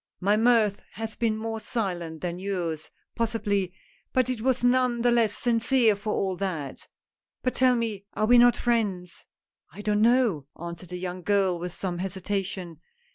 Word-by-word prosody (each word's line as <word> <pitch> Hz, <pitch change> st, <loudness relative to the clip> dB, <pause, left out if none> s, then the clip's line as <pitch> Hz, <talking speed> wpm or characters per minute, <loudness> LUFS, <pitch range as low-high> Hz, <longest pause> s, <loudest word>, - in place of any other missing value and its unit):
" -, -, -59 dB
My 210 Hz, -, +6 dB
mirth 220 Hz, -3 st, +3 dB
has 225 Hz, 0 st, -5 dB
been 225 Hz, -2 st, 0 dB
more 225 Hz, 0 st, -3 dB
silent 180 Hz, -8 st, -3 dB
than 175 Hz, 0 st, -3 dB
yours, 175 Hz, -5 st, -3 dB, 0.3 s
possi 225 Hz, -2 st, -1 dB
bly, 200 Hz, -3 st, +1 dB, 0.4 s
but 255 Hz, 0 st, +2 dB
it 240 Hz, -4 st, -4 dB
was 260 Hz, 0 st, +1 dB
none 245 Hz, -1 st, +3 dB
the 245 Hz, -, +4 dB
less 230 Hz, -3 st, +2 dB
sincere 235 Hz, -1 st, +3 dB
for 210 Hz, +2 st, -4 dB
all 190 Hz, -2 st, 0 dB
that. 165 Hz, -8 st, -4 dB, 0.6 s
But 255 Hz, -, 0 dB
tell 255 Hz, -1 st, +4 dB
me, 220 Hz, -4 st, -2 dB
are 215 Hz, -, +1 dB
we 240 Hz, +2 st, +6 dB
not 245 Hz, 0 st, +6 dB
friends? 200 Hz, -7 st, -1 dB
" -, -, -67 dB
" -, -, -67 dB
I 205 Hz, -, -9 dB
don't 210 Hz, 0 st, +1 dB
know," 225 Hz, -, +3 dB
answered 170 Hz, +1 st, -7 dB
the 180 Hz, -, -5 dB
young 180 Hz, 0 st, -5 dB
girl 190 Hz, -2 st, +1 dB
with 180 Hz, +1 st, -4 dB
some 175 Hz, -1 st, -4 dB
hesitation. 190 Hz, -2 st, -4 dB
205 Hz, 185 wpm, -26 LUFS, 180-235 Hz, 0.6 s, My